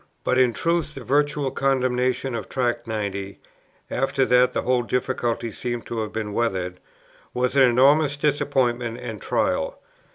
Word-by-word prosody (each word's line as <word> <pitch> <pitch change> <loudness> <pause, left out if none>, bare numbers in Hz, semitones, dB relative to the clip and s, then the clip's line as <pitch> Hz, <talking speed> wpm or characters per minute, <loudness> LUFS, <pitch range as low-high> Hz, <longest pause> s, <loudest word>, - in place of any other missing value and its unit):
But 130 - +2
in 125 -2 +4
truth 165 +3 -1
the 135 - -7
virtual 145 +1 +1
condemnation 130 -1 0
of 110 -4 -5
Tract 120 -2 -1
90, 100 -3 -4 0.5
after 135 +1 +1
that 125 0 +4
the - - -2
whole 125 -1 +2
difficulty 120 -2 -1
seemed 120 0 -4
to 115 - -4
have 110 -1 -3
been 110 -2 -4
weathered, 95 -6 -1 0.6
was 125 +1 0
an 140 - +5
enormous 140 +4 +4
disappointment 125 -5 0
and 115 -6 -7
trial. - - 0
125 Hz, 150 wpm, -23 LUFS, 115-135 Hz, 0.6 s, an